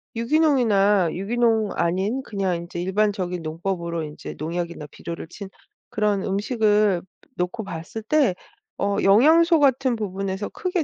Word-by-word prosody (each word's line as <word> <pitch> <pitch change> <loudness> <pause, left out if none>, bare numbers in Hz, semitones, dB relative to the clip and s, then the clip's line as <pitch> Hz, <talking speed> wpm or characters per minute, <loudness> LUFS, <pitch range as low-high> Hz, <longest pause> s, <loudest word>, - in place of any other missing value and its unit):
유기농이나 230 - +3
유기농 220 +1 +1
아닌 190 +9 0
그냥 195 -4 -1
인제 170 0 -6
일반적인 190 -2 0
농법으로 170 +1 -3
인제 150 -1 -8
농약이나 170 -1 -4
비료를 170 -1 -7
친 190 +3 -9 0.4
그런 210 -2 0
음식을 210 -2 +2 0.4
놓고 180 +6 -2
봤을 170 +3 -7
때 250 -6 +2 0.4
어 200 0 0
영양소 315 - +5
같은 265 -2 +3
부분에서 195 -1 -3
크게 360 -3 -2
200 Hz, 300 characters per minute, -23 LUFS, 180-230 Hz, 0.4 s, 영양소